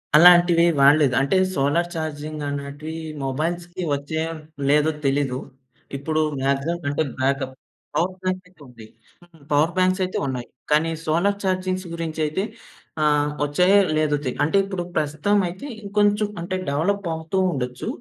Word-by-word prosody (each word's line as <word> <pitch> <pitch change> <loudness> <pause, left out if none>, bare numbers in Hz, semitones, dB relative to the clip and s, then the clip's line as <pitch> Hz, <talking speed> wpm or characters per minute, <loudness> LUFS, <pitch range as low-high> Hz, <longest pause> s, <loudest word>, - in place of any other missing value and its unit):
అలాంటివి 175 0 +7 0.2
వాడలేదు. 140 -1 +5
అంటే 140 +8 +2 0.2
సోలార్ 145 +6 +1
ఛార్జింగ్ 155 -1 -4
అనేటివి 145 +2 -5 0.3
మొబైల్స్‌కి 170 +6 -3
వచ్చాయో 160 +3 -3 0.4
లేదో 150 +2 +4
తెలీదు. 135 -2 +1 0.6
ఇప్పుడు 155 +3 -1 0.2
మాక్సిమం 140 +5 0
అంటే 145 +2 0 0.2
బ్యాకప్. 135 0 0 0.4
పవర్ 185 +2 0
బ్యాంక్ 185 0 -1
అయితే 180 -3 -24
ఉంది. 120 -3 -13 0.7
పవర్ 150 +4 +3
బ్యాంక్స్ 185 +1 +2
అయితే 185 - -4
ఉన్నాయి. 125 -2 -4 0.2
కానీ, 155 +2 +3 0.2
సోలార్ 180 +6 +1
ఛార్జింగ్ 185 0 -1
గురించి 165 -1 -4
అయితే 170 +6 -2 0.6
ఆహ్, 150 -1 +2
వచ్చాయో, 180 +7 +4 0.2
లేదో 155 -1 +2
తె - - +1
అంటే 160 +7 +2
ఇప్పుడు 190 -3 -3
ప్రస్తుతం 155 +7 +1
అయితే 185 +10 -7 0.2
ఇంకొంచెం 205 +1 +2
అంటే 180 +2 -3
డెవలప్ 190 +8 0
అవుతూ 160 +4 -4
ఉండొచ్చు. 125 -4 -4
160 Hz, 135 wpm, -23 LUFS, 145-180 Hz, 0.7 s, అలాంటివి